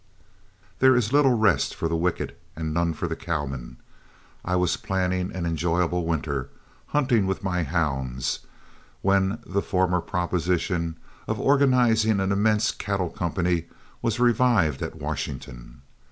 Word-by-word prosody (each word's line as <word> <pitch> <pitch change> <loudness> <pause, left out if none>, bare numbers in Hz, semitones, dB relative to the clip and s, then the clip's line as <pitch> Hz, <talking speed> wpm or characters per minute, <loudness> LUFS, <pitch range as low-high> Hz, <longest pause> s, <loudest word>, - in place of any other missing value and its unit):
There 130 0 +6
is 120 0 +1
little 140 -3 +5
rest 105 - +2
for 80 - -1
the 85 - -1
wicked 85 +1 -1 0.2
and 80 -1 -3
none 85 0 0
for 80 - -3
a 80 -1 -2
cowman. 70 -8 -4 0.7
I 90 - -1
was 90 -1 +2
planning 95 -3 -1
an 90 -2 -4
enjoyable 85 +1 0
winter, 70 -5 -2 0.4
hunting 125 -9 +2
with 95 +1 -2
my 90 -2 0
hounds, 65 -6 -1 0.6
when 95 +2 +2
the 100 +1 -1
former 90 -2 +1
proposition 85 -1 -1 0.3
of - - -2
organizing 120 -6 +3
an 95 0 0
immense 105 +2 +2
cattle 95 -4 -2
company 85 -1 -1 0.4
was 115 0 -1
revived 115 - +3
at - - -4
Washington. - - -6
90 Hz, 135 wpm, -25 LUFS, 80-105 Hz, 0.7 s, There